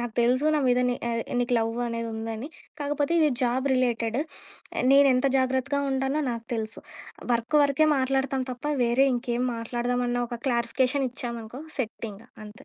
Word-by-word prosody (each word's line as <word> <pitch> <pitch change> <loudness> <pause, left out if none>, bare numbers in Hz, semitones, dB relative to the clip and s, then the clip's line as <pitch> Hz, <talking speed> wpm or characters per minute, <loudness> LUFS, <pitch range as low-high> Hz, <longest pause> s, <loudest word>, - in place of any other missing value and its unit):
నాకు 240 -2 -4
తెలుసు. 255 +4 +2
నా 300 - +2
మీద 250 0 +3
నీ 245 - 0
అదే 230 0 -1 0.2
నీకు 245 0 +1
లవ్ 225 +1 -1
అనేది 230 0 -3
ఉందని. 225 +4 -5 0.3
కాకపోతే, 290 +2 0
ఇది 305 -2 +4
జాబ్ 255 +3 +1
రిలేటెడ్. 235 -1 0 0.7
నేను 280 0 +7
ఎంత 255 +2 +2
జాగ్రత్తగా 265 +2 0
ఉంటానో 270 +3 0
నాకు 230 -1 -5
తెలుసు. 220 0 -4 0.5
వర్క్ 235 +5 +1
వరుకే 285 +2 +3
మాట్లాడతాం 265 0 0
తప్ప, 245 +3 -12 0.2
వేరే 250 +4 +3
ఇంకేం 245 0 -1
మాట్లాడదామన్న 245 +1 -1
ఒక 240 - -5
క్లారిఫికేషన్ 255 +2 +1
ఇచ్చామనుకో 235 +1 -6 0.2
సెట్ 230 -2 -3
ఇంకా. 225 +5 -15 0.2
అంతే. 210 +1 -13
245 Hz, 155 wpm, -26 LUFS, 235-270 Hz, 0.7 s, నేను